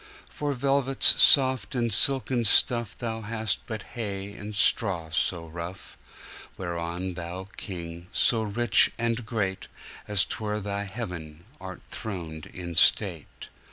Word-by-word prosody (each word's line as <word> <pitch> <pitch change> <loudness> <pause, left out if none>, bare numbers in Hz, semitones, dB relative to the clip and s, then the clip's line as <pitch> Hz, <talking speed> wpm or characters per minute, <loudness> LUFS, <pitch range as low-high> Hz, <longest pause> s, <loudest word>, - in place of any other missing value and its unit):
For 145 -1 -3
velvets 135 0 +3
soft 130 -4 +4
and 120 -2 +1
silken 135 -2 +4
stuffThou 115 0 +2
hast 110 -2 -1
but 110 -3 -5
hay 100 -3 -5
and 105 +1 -8
straw 90 -7 +1
so 85 +1 0
rough, 85 +3 -8 0.6
Whereon 85 +1 -4
Thou 90 +2 -7
King, 85 -2 -7
so 115 -2 +3
rich 110 +2 +3
and 115 0 -1
great, 100 -5 -2 0.4
As 105 -3 +2
'twere 105 -1 -3
Thy 100 0 -4
heaven, 90 -7 -7
art 95 -2 -9
throned 85 -7 -6
in 85 -2 -8
state. 85 -1 +2
100 Hz, 120 wpm, -26 LUFS, 90-115 Hz, 0.6 s, soft